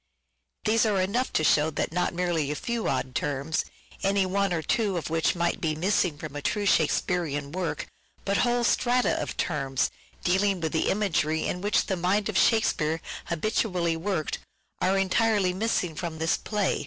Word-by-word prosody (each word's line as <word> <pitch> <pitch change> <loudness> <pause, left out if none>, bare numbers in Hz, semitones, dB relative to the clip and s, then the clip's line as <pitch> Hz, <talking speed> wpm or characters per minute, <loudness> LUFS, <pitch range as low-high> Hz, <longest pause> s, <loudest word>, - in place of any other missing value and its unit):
These 225 +1 +3
are 205 -3 +1
enough 200 +8 0
to 155 - +2
show 155 0 +4
that 160 - -2
not 180 0 +1
merely 170 -4 0
a 150 - -1
few 235 +6 -2
odd 130 - -2
terms, 145 +3 -1 0.4
any 195 0 +2
one 195 +1 0
or 165 -2 -1
two 205 +2 +1
of 160 - -4
which 165 +2 +2
might 170 0 0
be 155 -2 0
missing 180 -2 +1
from 150 -1 -8
a 145 - -4
true 205 +7 -1
Shakespearean 155 -4 +1
work, 180 0 -3 0.4
but 200 0 +1
whole 240 0 +2
strata 245 +1 +2
of - - -5
terms, 135 -5 0 0.3
dealing 190 +1 +2
with 160 -2 -2
the 160 - +1
imagery 160 -6 +1
in 180 - -2
which 205 +2 +2
the 190 - -1
mind 195 +4 +1
of 215 - -4
Shakespeare 165 -8 +2 0.3
habitually 175 -1 0
worked, 165 -2 -2 0.4
are 190 +1 +2
entirely 195 0 +2
missing 185 -4 0
from 160 0 -5
this 160 +1 +1
play. 210 -3 -1
180 Hz, 175 wpm, -27 LUFS, 160-205 Hz, 0.4 s, show